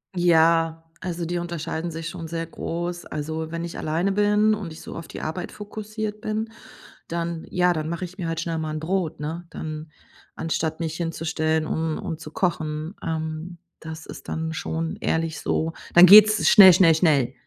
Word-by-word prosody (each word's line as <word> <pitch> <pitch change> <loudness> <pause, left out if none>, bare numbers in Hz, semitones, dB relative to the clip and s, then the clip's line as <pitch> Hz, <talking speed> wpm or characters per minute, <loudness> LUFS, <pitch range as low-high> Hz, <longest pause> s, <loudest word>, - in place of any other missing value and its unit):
Ja, 165 -1 +3 0.2
also 175 -2 -3
die 175 +1 -2
unterscheiden 170 -1 -4
sich 165 +1 -5
schon 165 -3 -7
sehr 165 0 -3
groß. 175 +1 -5
Also, 160 +1 -4
wenn 170 0 -4
ich 170 - -6
alleine 170 +5 0
bin 210 +1 +3
und 195 -6 -4
ich 160 - -10
so - - -9
auf 165 - -7
die - - -8
Arbeit 160 +3 -4
fokussiert 215 0 -6
bin, 220 0 -2 0.6
dann 170 -1 -3
ja, 180 -1 +2
dann 155 0 -3
mache 170 +2 -3
ich 185 +3 -12
mir 170 -3 -3
halt 165 0 -2
schnell 165 -1 -2
mal 155 -1 -3
'n - - -3
Brot, 175 -1 -2
ne, 165 +4 -5
dann 155 -1 -7 0.4
anstatt 160 0 -2
mich 160 -1 -3
hinzustellen, 160 -1 -1
um 160 0 -1
um 160 - -4
zu 155 -1 -10
kochen. 160 -3 -2
Ähm, 160 +1 -4 0.2
das 160 0 -8
ist - - -10
dann 160 0 -3
schon 160 +1 -3
ehrlich 160 -1 -1
so. 160 +1 -1 0.2
Dann 175 +1 +10
geht's 215 +2 +8
schnell, 190 -3 +10
schnell, 165 -3 +6
schnell. 145 -7 +2
165 Hz, 180 wpm, -24 LUFS, 160-180 Hz, 0.6 s, Dann